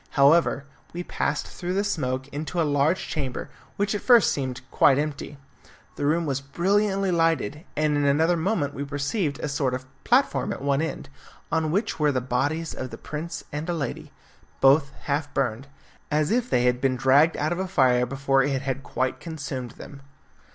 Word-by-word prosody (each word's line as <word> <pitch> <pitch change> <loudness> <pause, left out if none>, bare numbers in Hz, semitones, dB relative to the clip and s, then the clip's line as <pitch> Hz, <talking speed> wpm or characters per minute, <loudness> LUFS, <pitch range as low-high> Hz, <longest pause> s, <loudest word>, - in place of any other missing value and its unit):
However, 140 0 +4 0.3
we 175 +1 -4
passed 150 - -2
through 180 +1 -5
the 200 - +2
smoke 130 -9 -2
into 155 +5 -4
a - - +4
large 145 +4 +1
chamber, 135 -5 -4 0.3
which 200 +1 0
at 205 - -2
first 240 -4 +6
seemed 130 -3 -3
quite 135 - +5
empty. 145 -1 -3 0.6
The 145 - -1
room 165 +3 +2
was 135 -2 -1
brilliantly 195 +6 +1
lighted, 165 - 0
and 150 -1 +2
in 145 0 +1
another 160 +5 +3
moment 160 -4 0
we 140 - -4
perceived 145 +2 -2
a - - -2
sort 140 -3 0
of 130 0 -7 0.2
platform 250 -3 +2
at 200 - -5
one 140 0 +1
end, 160 - -4 0.4
on 160 -1 +1
which 195 +4 -1
were 150 -1 +3
the 130 - 0
bodies 145 +7 -1
of 130 - -5
the - - -8
prince 155 +3 -6
and 150 +4 -4
a 175 - 0
lady, 140 -7 -4 0.5
both 140 +1 +5
half 145 0 -1
burned, 130 0 -1 0.4
as 150 +2 +1
if 245 +1 +1
they 120 - +2
had 125 0 +2
been 135 -1 +2
dragged 140 +6 +4
out 155 +2 0
of 175 - -1
a 190 - -1
fire 130 -9 +3
before 135 +1 +1
it 135 0 0
had 135 0 -2
quite 130 0 -2
consumed 140 -7 -6
them. 140 -1 -11
145 Hz, 185 wpm, -25 LUFS, 135-170 Hz, 0.6 s, first